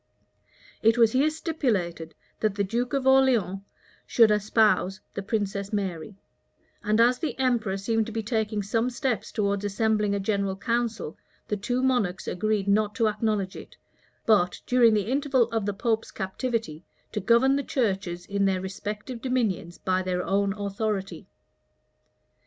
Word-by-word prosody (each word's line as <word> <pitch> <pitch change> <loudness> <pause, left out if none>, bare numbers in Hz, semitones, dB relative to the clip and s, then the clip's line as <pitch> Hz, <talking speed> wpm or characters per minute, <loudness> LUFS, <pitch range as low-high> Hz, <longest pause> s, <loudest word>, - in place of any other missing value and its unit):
It 225 +2 +4
was 230 -2 +5
here 275 +5 +3
stipulated, 220 - -2 0.2
that 215 -2 0
the 200 - 0
duke 240 +5 -2
of 275 -2 0
Orleans 260 -8 +3 0.5
should 225 -3 +5
espouse 210 -2 +2
the - - -4
princess 200 -1 -2
Mary; 195 -2 -3 0.7
and 215 +1 +1
as 245 +2 +4
the 300 -8 -3
emperor 240 -7 +1
seemed 225 +2 0
to - - -6
be 225 0 -3
taking 215 -2 -1
some 225 +5 0
steps 240 -4 -2
towards 200 -2 -1
assembling 210 0 +1
a - - -1
general 200 -1 -1
council, 230 -4 -2 0.3
the 210 - +1
two 245 +5 -2
monarchs 210 -9 0
agreed 210 +1 -1
not 210 +1 +2
to 230 -3 +2
acknowledge 210 -3 -1
it, - - -11 0.5
but, 190 -5 +3
during 240 -3 +5
the 205 -2 +1
interval 270 +1 +2
of 225 -3 -1
the - - +1
pope's 225 +2 -1
captivity, 190 - -3 0.3
to 210 - -2
govern 235 +6 +4
the 280 - +1
churches 195 -9 -2
in 200 0 0
their 190 -1 +1
respective 210 +5 -6
dominions 220 -10 -1
by 185 0 0
their 180 -1 -2
own 200 0 +1
authority. 200 -3 -3
215 Hz, 150 wpm, -26 LUFS, 195-235 Hz, 0.7 s, was